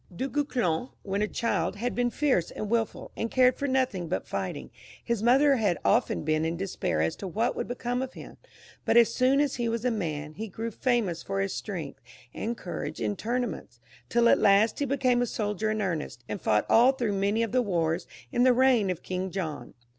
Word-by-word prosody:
Du 255 +10 -3
Guesclin, 255 - -1
when 200 +1 -2
a 210 - +1
child, 230 -2 -1
had 240 +4 -2
been 245 0 +1
fierce 255 - +1
and 210 0 -5
wilful, 230 -2 -1
and 230 - -2
cared 255 0 +4
for 280 - -2
nothing 255 -10 0
but 170 - -2
fighting; - - -4 0.3
his 235 -3 -1
mother 270 +4 +5
had 205 -6 +1
often - - +2
been 155 0 +1
in 165 +1 -1
despair 125 - -1
as 80 - -1
to 195 - -6
what 225 +7 0
would - - -3
become 245 0 -2
of 260 0 -5
him, - - -11 0.5
but - - +3
as 235 -1 +6
soon 260 +2 +3
as 290 -2 +1
he 235 -1 0
was 230 +1 -2
a 250 - +3
man, 155 -8 -3
he 220 +6 -5
grew 225 +3 -5
famous 220 -8 0
for 100 - -3
his 95 0 -1
strength - - -6 0.3
and 235 +1 -3
courage 180 - -5
in 205 - -1
tournaments, 235 - -3 0.3
till 235 0 +4
at - - +5
last 205 +3 +4
he 285 - +1
became 255 -2 +2
a 245 - +1
soldier 210 -1 -2
in 215 0 -1
earnest, 155 - -3
and 105 - -5
fought 105 -1 +2
all 245 +4 +6
through 240 -6 -1
many 200 +3 +1
of 230 - -2
the 255 +1 +3
wars 170 -5 -1 0.2
in 240 - +1
the 255 0 +6
reign 245 -5 +4
of 180 -2 -3
King 185 +1 -3
John. 160 -9 -5
225 Hz, 215 wpm, -28 LUFS, 180-245 Hz, 0.5 s, as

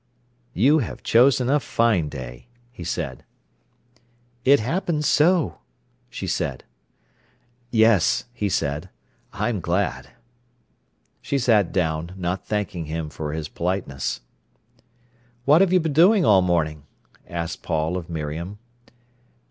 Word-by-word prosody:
"You 145 +7 +4
have 125 - -5
chosen 125 +1 +4
a 145 +3 +3
fine 110 - +1
day," 65 - -9 0.2
he 120 - -9
said. - - -4 1.2
"It 140 +2 +6
happens 155 - -1
so," 170 +3 +3 0.5
she - - -6
said. - - -2 1.1
"Yes," 110 -6 +3
he 105 -4 -2
said; 75 0 -2 0.4
"I 105 +3 -1
am 110 -5 -2
glad." 90 +4 -1 1.1
She 140 - -1
sat 115 -7 +3
down, 80 -1 -1
not 90 +1 -3
thanking 100 -5 -2
him 80 0 -4
for 75 0 -5
his 80 -1 -4
politeness. 85 -9 -3 1.2
"What 150 +5 +6
have 195 -2 +3
you 185 - +5
been 160 -3 -2
doing 180 +5 +5
all 100 -6 +6
morning?" 80 -4 -1 0.4
asked 85 -1 -4
Paul 80 +1 -1
of 90 -2 -5
Miriam. 80 +4 -5
95 Hz, 120 wpm, -23 LUFS, 80-130 Hz, 1.2 s, It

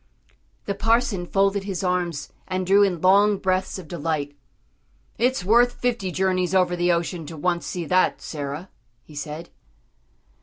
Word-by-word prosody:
The 200 - -1
parson 210 -3 +1
folded 195 +1 +1
his 195 -2 -3
arms 175 -5 -2
and 185 0 -2
drew 195 +2 +5
in 185 -5 +2
long 200 +2 +5
breaths 185 0 -1
of 185 -4 -9
delight. 150 -3 -3 0.8
"It's 250 -4 +1
worth 240 +4 +4
fifty 235 -8 -2
journeys 185 0 0
over 180 -1 +3
the 175 0 +2
ocean 170 -1 -2
to 160 - -8
once 175 +2 -1
see 175 -2 -4
that, 185 +3 +2
Sarah," 145 +4 -6 0.3
he 155 - -16
said. 150 +3 -6
185 Hz, 150 wpm, -24 LUFS, 170-195 Hz, 0.8 s, drew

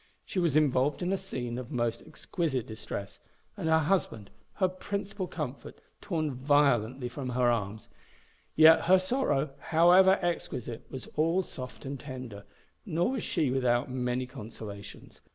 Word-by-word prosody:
She 185 - -2
was 165 -5 +2
involved 145 +1 +2
in 180 +2 0
a - - +3
scene 125 -11 -4
of 125 -1 -8
most 120 -3 -1
exquisite 155 - -2
distress, 105 -2 -7 0.4
and 160 - -2
her 160 - +5
husband, 155 - 0 0.2
her 185 - +2
principal 195 +1 -4
comfort, 145 -6 -6 0.2
torn 155 -7 -2
violently 130 -2 +2
from 130 +1 -5
her 125 -1 +2
arms; 110 -1 -3 0.7
yet 160 +1 +7
her 185 +2 +7
sorrow, 185 - 0
however 175 +4 +5
exquisite, 125 -9 -3
was 130 -2 -7
all 165 +5 +2
soft 130 -6 -9
and 135 0 -5
tender, 125 -7 -8 0.4
nor 170 +9 0
was 260 -4 -2
she 155 -7 0
without 125 -1 +1
many 125 0 -1
consolations. 105 -5 -10
140 Hz, 145 wpm, -29 LUFS, 125-170 Hz, 0.7 s, yet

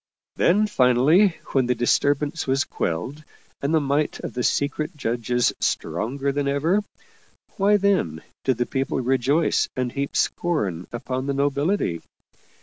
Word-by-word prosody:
Then, 205 +5 +3
finally, 155 - +4 0.2
when 130 -3 +2
the 125 - +1
disturbance 145 +6 +1
was 135 +1 +2
quelled 125 - -4 0.4
and 140 - -1
the 160 - +4
might 145 +1 0
of - - -6
the 125 - -2
secret 150 +5 -1
judges 120 -1 0
stronger 120 - -1
than 140 0 -1
ever, 160 +9 +1 0.8
why 205 +1 +4
then 185 - 0 0.2
did 130 -3 +1
the 120 - 0
people 135 +1 -2
rejoice 135 +5 +1
and 125 -1 -1
heap 140 +2 -4
scorn 100 - -1
upon 130 +2 -4
the 140 - -1
nobility? 140 - 0
140 Hz, 140 wpm, -23 LUFS, 125-155 Hz, 0.8 s, finally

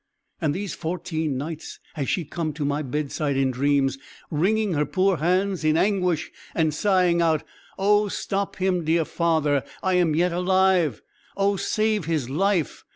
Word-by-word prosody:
And 150 -3 0
these 195 -1 -4
fourteen 160 -4 -3
nights 155 +3 -6
has 140 -4 -3
she 175 - 0
come 155 +1 -3
to 150 0 -3
my 145 +1 0
bedside 145 0 -2
in 135 -1 +2
dreams, 135 +1 +1 0.3
wringing 200 +6 +1
her 150 -1 +2
poor 185 +5 +1
hands 185 +3 +1
in 155 0 +3
anguish, 180 -4 +1 0.2
and 160 -2 +2
sighing 180 -1 +2
out, 160 -2 +2 0.3
'Oh 205 +2 +3
stop 200 0 -3
him, 185 -2 0
dear 160 +1 +2
father! 155 -6 +1 0.2
I 185 - +1
am 175 -4 +3
yet 175 +2 +2
alive! 180 - +2 0.3
Oh 200 0 +2
save 215 -1 0
his 150 -6 -1
life! 180 0 0
165 Hz, 160 wpm, -24 LUFS, 150-190 Hz, 0.3 s, in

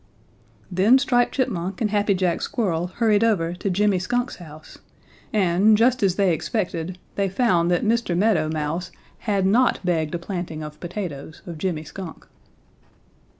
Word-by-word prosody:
"Then 195 +8 +5
Striped 245 -3 +1
Chipmunk 190 -8 -2
and 215 -3 0
Happy 205 -1 +2
Jack 180 -2 0
Squirrel 180 -7 -1
hurried 215 +2 +2
over 175 -7 +1
to 180 +3 -3
Jimmy 200 0 +2
Skunk's 245 +6 -2
house, 155 -3 -13 0.5
and, 200 +1 +4
just 250 +3 +3
as 190 -3 +2
they 195 -3 +3
expected, 180 -1 -3 0.2
they 200 -1 0
found 185 -5 +2
that 175 +2 +1
Mr. 225 -6 +1
Meadow 180 -6 +2
Mouse 160 +3 -2 0.4
had 195 -2 +2
not 235 +6 +3
begged 160 -3 0
a - - 0
planting 170 -3 -5
of 150 0 -9
potatoes 170 -5 -6
of 170 -3 -8
Jimmy 165 -3 -2
Skunk. 180 +2 -9
185 Hz, 150 wpm, -23 LUFS, 170-210 Hz, 0.5 s, Then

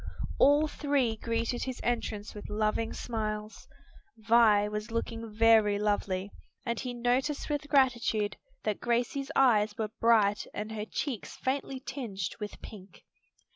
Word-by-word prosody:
All 290 +2 +5
three 280 -6 0
greeted 230 +2 -2
his 260 -1 -5
entrance 225 -3 -2
with 210 - -8
loving 215 +1 0
smiles. 215 -2 -4 0.5
Vi 220 -2 +4
was 210 +1 -4
looking 230 -1 -4
very 220 -1 +5
lovely, 205 -2 -1 0.3
and 235 -2 -1
he 255 - -3
noticed 250 +5 0
with 290 0 -2
gratitude 240 -7 +2 0.3
that 210 - -1
Gracie's 250 +4 0
eyes 215 -5 +4
were 215 -2 -2
bright 215 -3 +3
and 210 +1 -4
her 215 -1 -4
cheeks 240 -1 -4
faintly 265 0 -2
tinged 210 -10 -4
with 210 -1 -6
pink. 195 -4 -12
225 Hz, 135 wpm, -30 LUFS, 210-250 Hz, 0.5 s, All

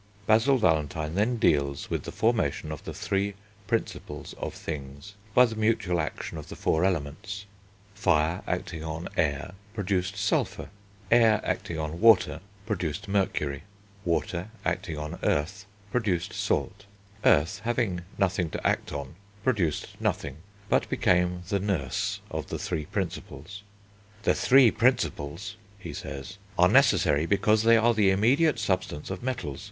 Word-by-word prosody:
Basil 115 +6 +4
Valentine 80 - +1
then 110 +6 +1
deals 70 -8 +1
with - - -2
the - - -5
formation 110 -10 0
of 75 - -7
the - - -4
three 100 0 -1 0.3
Principles 115 +1 -3
of - - -4
things, 70 +4 -7 0.2
by 125 - +8
the 115 -2 -4
mutual 110 -5 +1
action 80 +1 -5
of 75 - -10
the - - -7
four 80 +2 +1
Elements. 95 +3 -2 0.5
Fire 85 -4 +1
acting 85 -3 -3
on 80 +1 -4
Air 80 +2 0 0.2
produced 95 -2 -1
Sulphur; 100 0 0 0.4
Air 115 -3 +6
acting 85 - -2
on 80 +1 -4
Water 95 -9 +5 0.2
produced 95 -3 -3
Mercury; 75 -8 0 0.4
Water 85 +2 -1 0.2
acting 90 -2 -2
on 75 +3 -5
Earth 75 +6 -1 0.2
produced 100 -8 0
Salt. 100 +1 -2 0.4
Earth 75 +4 +4
having 115 -7 0 0.2
nothing 95 -3 +1
to - - -2
act - - 0
on 70 -2 -5 0.3
produced 95 - 0
nothing, 70 0 -2 0.3
but - - +1
became 90 0 +2
the 100 -1 +1
nurse 90 -10 -1
of - - -4
the - - -4
three 80 -4 -3
Principles. 90 +9 -5 0.6
"The - - +4
three 130 -3 +6
Principles," 105 - 0 0.2
he 85 -6 -8
says, 70 +10 -7 0.2
"are 90 - +6
necessary 75 -3 +4
because 105 +2 +3
they 115 +1 +6
are 115 +1 +4
the 105 -3 +4
immediate 125 +11 +3
substance 90 -4 -2
of 95 - -5
metals. 120 - -3
90 Hz, 140 wpm, -27 LUFS, 80-105 Hz, 0.6 s, by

